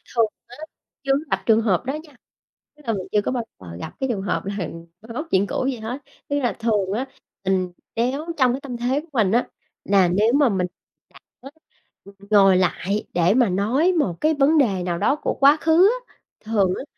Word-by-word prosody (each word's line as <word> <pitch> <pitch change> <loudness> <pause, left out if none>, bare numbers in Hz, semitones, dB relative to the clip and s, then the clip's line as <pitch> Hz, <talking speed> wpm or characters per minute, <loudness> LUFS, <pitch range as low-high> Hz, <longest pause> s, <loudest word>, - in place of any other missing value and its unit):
Thường 230 -1 +4 0.2
á 245 - -13 0.5
chưa 275 - 0
có 275 - +2
gặp - - 0
trường 225 0 +4
hợp 210 +1 +1
đó 270 - -2
nha, 295 -4 -18 0.6
tức 300 - -20
là 225 - +1
mình 190 -2 -4
chưa 210 - +3
có 205 - -2
bao 245 -3 -2 0.2
giờ 85 -3 -10
gặp - - -7
cái 265 - 0
trường 210 -5 -1
hợp 190 -1 -2
là 200 +1 -4 0.4
moi 225 +2 -10
móc 305 +7 -4
chuyện 195 +1 +3
cũ 255 - -2
gì 270 - -1
hết. 240 +6 -5 0.3
Tức 285 - +1
là 245 -6 0
thường 210 -4 0
á 260 +4 -2 0.4
mình 185 -1 0 0.2
nếu 255 +6 -1
trong 255 -3 +3
cái 270 - -4
tâm 250 -4 -6
thế 250 +4 0
của 325 - -19
mình 215 -7 +2
á 240 +2 +2 0.4
là 195 -2 +4
nếu 210 +6 +2
mà 280 -3 +4
mình 185 -3 0 0.4
cảm - - -18 0.2
á, 270 - -10 0.6
ừm, 200 - -14 0.2
ngồi 195 -2 +6
lại 185 +3 0
để 175 +2 +3
mà 245 -3 +3
nói 245 - +2
một 250 - 0
cái 310 +1 +3
vấn 295 +2 +3
đề 200 -11 +2
nào 175 -1 -2
đó 275 - +2
của - - -2
quá 285 +2 +7
khứ 330 +5 +5 0.2
á, - - -26 0.2
thường 205 -4 +1
á - - -5
230 Hz, 225 wpm, -22 LUFS, 195-270 Hz, 0.6 s, quá